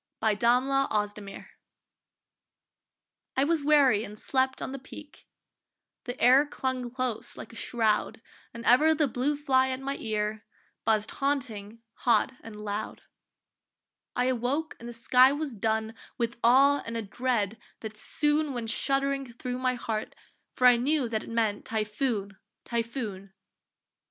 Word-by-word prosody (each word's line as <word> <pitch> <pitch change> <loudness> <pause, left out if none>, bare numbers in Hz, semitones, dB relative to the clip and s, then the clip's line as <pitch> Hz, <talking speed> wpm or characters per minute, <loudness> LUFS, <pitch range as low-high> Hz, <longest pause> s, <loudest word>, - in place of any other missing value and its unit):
TYPHOON 215 0 +1 0.3
(At 275 0 +1
Hong 210 -1 0
kong) 200 -1 -9 1.9
I 265 - +4
was 315 0 +1
weary 280 -7 +4
and 210 -1 -9
slept 260 +3 0
on - - -4
the 275 - -6
Peak; 295 +3 -13 0.8
The 245 0 -5
air 260 +3 +6
clung 260 -3 -3
close 255 -2 -2
like 230 - -9
a - - -12
shroud, 220 -2 0 0.3
And 235 +1 -9
ever 310 +6 +5
the 300 -1 +2
blue 260 +4 0
fly 265 -3 +2
at 260 0 -2
my 275 +1 -3
ear 215 -1 -2 0.4
Buzzed 215 -1 +2
haunting, 230 -6 -3
hot 235 0 +2
and 225 -2 -10
loud; 210 0 -5 1.1
I 250 - +1
awoke 260 +5 -1
and 235 - -8
the - - -7
sky 250 +3 +5
was 290 -2 -3
dun 220 +1 -1 0.2
With 235 -1 -2
awe 275 +4 +5
and 230 0 -5
a 225 - -3
dread 225 0 -1 0.2
that 220 -1 -7
soon 295 +5 +1
Went 230 -2 -2
shuddering 275 0 0
thro 250 +1 -5
my 255 -1 +1
heart, 220 -3 -4 0.4
for 250 - +1
I 245 -1 +8
knew 275 +2 +1
That 220 -1 -2
it - - -11
meant 225 -3 0
typhoon! 215 -2 -2 0.3
typhoon! 230 -5 -4
240 Hz, 145 wpm, -28 LUFS, 220-270 Hz, 1.9 s, I